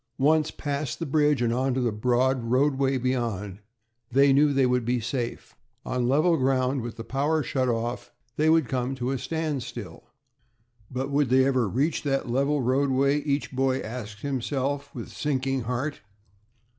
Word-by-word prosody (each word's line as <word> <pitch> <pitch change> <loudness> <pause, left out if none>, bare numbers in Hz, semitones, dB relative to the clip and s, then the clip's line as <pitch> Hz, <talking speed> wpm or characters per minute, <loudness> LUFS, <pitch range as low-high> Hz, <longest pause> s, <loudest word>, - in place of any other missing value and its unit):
Once 155 +3 +3
past 140 -4 -3
the 165 - -4
bridge 150 -2 +2
and 115 -1 +1
onto 130 +1 0
the 120 -2 +1
broad 125 +3 +1
roadway 135 +2 +2
beyond, 115 -6 -2 0.5
they 140 +2 +5
knew 145 +2 +5
that 145 - 0
they 135 -1 +4
would 125 -1 +1
be 120 +2 0
safe. 120 +1 -4 0.3
On 125 -1 -1
level 160 +5 +3
ground, 130 0 +1
with 115 -1 -6
the 115 - -6
power 145 +5 0
shut 130 -2 0
off, 120 +1 -3 0.2
they 155 +1 +2
would 160 -4 +4
come 130 0 -2
to 125 0 -2
a 135 - -2
standstill. 130 - -4 0.8
But 130 +2 -3
"would 140 -2 +2
they 130 +1 +5
ever 130 -5 +1
reach 140 - 0
that 135 -3 -1
level 140 +3 +1
roadway?" 135 +2 +2
each 140 -1 -1
boy 130 0 +1
asked 110 -2 -7
himself, 140 +1 -2
with 120 - -6
sinking 135 -3 -1
heart. 130 +5 -3
130 Hz, 165 wpm, -26 LUFS, 125-140 Hz, 0.8 s, they